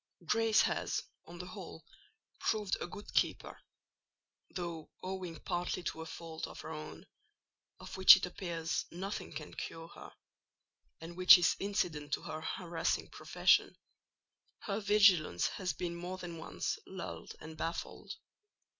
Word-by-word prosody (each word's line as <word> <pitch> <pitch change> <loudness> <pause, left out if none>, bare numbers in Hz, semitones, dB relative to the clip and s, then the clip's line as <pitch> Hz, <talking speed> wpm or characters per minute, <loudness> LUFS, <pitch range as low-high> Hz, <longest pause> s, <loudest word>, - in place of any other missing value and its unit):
Grace 225 -1 +4
has, - - -1 0.2
on 170 +1 -10
the 180 - -6
whole, 185 -3 -9 0.5
proved 210 -3 0
a - - -2
good 205 +4 -10
keeper; - - 0 0.9
though, 170 -3 -5
owing 185 -3 -5
partly 175 0 -2
to 160 - -3
a 160 - -7
fault 165 -1 -6
of - - -9
her - - -7
own, 155 -1 -8 0.7
of - - -8
which 190 0 +11
it 190 - -1
appears 170 -3 -3
nothing 195 +4 -5
can 150 +1 -7
cure 165 0 -6
her, - - -11 0.9
and 165 +1 -9
which 185 +1 +10
is 175 - +3
incident 175 -7 -1
to - - -1
her 155 0 -5
harassing 170 +1 -2
profession, - - +3 0.8
her 200 0 -2
vigilance 200 - +4
has 185 -2 -2
been 170 -1 -4
more 180 +2 -5
than 175 -3 -7
once 160 - -3
lulled 85 -1 -7
and 160 0 -9
baffled. 165 +2 -4
175 Hz, 140 wpm, -34 LUFS, 160-190 Hz, 0.9 s, which